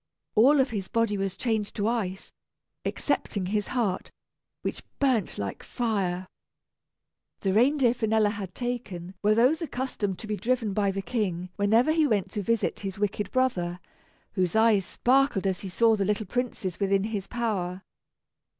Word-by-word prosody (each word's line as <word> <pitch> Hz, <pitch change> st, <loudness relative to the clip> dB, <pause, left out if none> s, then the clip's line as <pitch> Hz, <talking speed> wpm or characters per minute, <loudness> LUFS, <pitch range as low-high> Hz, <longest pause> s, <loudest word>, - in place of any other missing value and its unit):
All 275 Hz, +7 st, +6 dB
of 265 Hz, -1 st, +2 dB
his 200 Hz, -4 st, -3 dB
body 230 Hz, -2 st, +1 dB
was 195 Hz, -1 st, -2 dB
changed 220 Hz, -4 st, -1 dB
to 205 Hz, 0 st, 0 dB
ice, 200 Hz, -5 st, -2 dB, 0.5 s
excepting 200 Hz, -3 st, -1 dB
his 210 Hz, +2 st, -1 dB
heart, 220 Hz, -7 st, -1 dB, 0.5 s
which -, -, -3 dB, 0.2 s
burnt 255 Hz, -8 st, +1 dB
like 100 Hz, -1 st, -4 dB
fire. 195 Hz, -6 st, -1 dB, 1.2 s
The 190 Hz, -2 st, +1 dB
reindeer 250 Hz, +2 st, +4 dB
Finella 220 Hz, -3 st, +2 dB
had 200 Hz, -3 st, -6 dB
taken 215 Hz, -8 st, -4 dB
were 210 Hz, +1 st, +4 dB
those 255 Hz, +9 st, +4 dB
accustomed 250 Hz, -, -2 dB
to -, -, -9 dB
be 215 Hz, 0 st, -2 dB
driven 235 Hz, -3 st, 0 dB
by 200 Hz, 0 st, +2 dB
the 195 Hz, 0 st, -2 dB
King 185 Hz, -4 st, -2 dB
whenever 220 Hz, +8 st, +3 dB
he 315 Hz, -1 st, +3 dB
went 205 Hz, -7 st, 0 dB
to 210 Hz, -, -2 dB
visit 230 Hz, +2 st, 0 dB
his 195 Hz, -1 st, -5 dB
wicked 205 Hz, 0 st, -1 dB
brother, 180 Hz, -9 st, 0 dB, 0.5 s
whose 185 Hz, -2 st, 0 dB
eyes 220 Hz, -4 st, +4 dB
sparkled 260 Hz, -5 st, +2 dB
as 190 Hz, -1 st, 0 dB
he 195 Hz, -, -6 dB
saw 225 Hz, +4 st, +4 dB
the 200 Hz, -, 0 dB
little 210 Hz, +2 st, 0 dB
princes 205 Hz, -5 st, -3 dB
within 195 Hz, -1 st, +2 dB
his 205 Hz, -3 st, -3 dB
power. 195 Hz, -6 st, -2 dB
210 Hz, 160 wpm, -27 LUFS, 195-235 Hz, 1.2 s, All